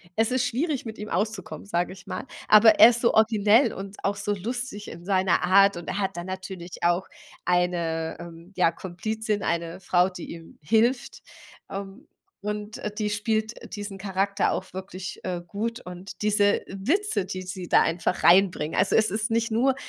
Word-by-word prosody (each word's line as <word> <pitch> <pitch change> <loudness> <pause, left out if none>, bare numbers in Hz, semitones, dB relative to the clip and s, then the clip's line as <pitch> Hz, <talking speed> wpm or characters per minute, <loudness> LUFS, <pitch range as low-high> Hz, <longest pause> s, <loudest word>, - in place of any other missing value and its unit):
es 225 +2 +2
ist 255 -1 +1
schwierig 280 +3 -1
mit 220 -1 -7
ihm 210 0 -7
auszukommen, 190 -3 -3
sage 175 -1 -1
ich 190 +1 -15
mal. - - -5 0.2
Aber 215 +1 +7
er 230 - +11
ist 235 -1 -1
so 235 - +3
originell 220 +2 +4
und 195 +1 -8
auch 200 +1 0
so 200 +1 -2
lustig 220 +1 -5
in 170 +1 -10
seiner 190 -2 +2
Art 195 +1 +5
und 175 - -8
er 205 - -2
hat 195 -2 -2
dann 175 - -4
natürlich 185 -2 -7
auch 175 +2 +2 0.4
eine, 170 -2 0
ähm, 170 +2 -11
ja 170 -2 +4
Komplizin, 210 +4 -3
eine 170 +1 -2
Frau, 180 0 +2
die 180 -2 -8
ihm 165 -1 -11
hilft, 235 - +1 0.5
ähm, 200 +8 -7 0.4
und 210 +1 -5 0.2
die 210 -1 -1
spielt 220 +1 -1 0.2
diesen 205 -2 -7
Charakter 195 0 0
auch 185 0 -4
wirklich, 190 0 -7
äh, 180 -1 -3
gut 230 +5 -3
und 180 +3 -9
diese 205 -1 +3
Witze, 220 - 0
die 185 0 -5
sie 185 -1 -6
da - - +6
einfach 170 +2 -1
reinbringen. 175 -4 +4
Also, - - +2
es 220 -3 +3
ist 215 +3 -1
nicht 230 0 0
nur 255 +4 +2
200 Hz, 180 wpm, -25 LUFS, 180-220 Hz, 0.5 s, er